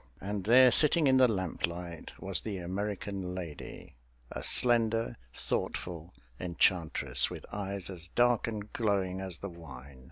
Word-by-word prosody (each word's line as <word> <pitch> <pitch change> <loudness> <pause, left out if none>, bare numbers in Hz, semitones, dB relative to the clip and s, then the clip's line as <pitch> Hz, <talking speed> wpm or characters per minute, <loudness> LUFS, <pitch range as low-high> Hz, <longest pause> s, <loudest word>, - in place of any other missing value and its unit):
And 100 0 -4
there, 125 +3 +7
sitting 155 +3 +4
in 130 -1 +5
the 130 -1 +7
lamplight, 90 -4 -3
was 95 -2 -2
the 105 -3 -4
American 95 0 -4
lady 80 -8 -8 0.3
a - - -5
slender, 115 -1 +2 0.2
thoughtful 85 -1 -3 0.3
enchantress 85 -2 +2
with - - -8
eyes 100 -2 -4
as 90 -3 -7
dark 120 +4 +2
and 105 -2 -5
glowing 95 -4 0
as 95 -3 -4
the 100 - -6
wine. 70 -6 -11
95 Hz, 135 wpm, -31 LUFS, 85-110 Hz, 0.3 s, there